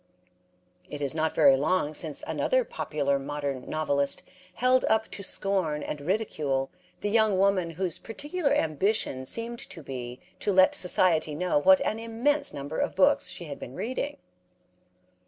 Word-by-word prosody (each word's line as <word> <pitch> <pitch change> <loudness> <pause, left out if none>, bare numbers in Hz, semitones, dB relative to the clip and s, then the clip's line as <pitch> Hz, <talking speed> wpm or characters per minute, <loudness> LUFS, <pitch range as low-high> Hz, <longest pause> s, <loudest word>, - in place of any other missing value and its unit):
It 145 - -6
is 140 -2 0
not 160 0 -1
very 140 -4 +6
long 150 +2 +1
since 155 -1 -4
another - - +1
popular 140 - -1
modern 140 -1 -4
novelist 140 -3 0 0.3
held 255 +1 +3
up 220 0 +1
to - - -6
scorn 185 -6 0
and 150 - -5
ridicule 150 -7 -1 0.3
the 205 - -1
young 220 -3 +3
woman 190 -3 +2
whose 185 -3 -1
particular 295 +6 -3
ambition 160 - 0
seemed 235 - -2
to 175 -5 -10
be 125 -2 -6 0.2
to 205 - 0
let 185 -1 +5
society 165 -4 +2
know 180 -1 +1
what 190 +5 +6
an 220 - -1
immense 265 +6 0
number 145 +2 -5
of - - -1
books 185 - +3
she 175 - -7
had 145 -3 -7
been 125 - -8
reading. 260 +5 -3
175 Hz, 155 wpm, -27 LUFS, 145-220 Hz, 0.3 s, very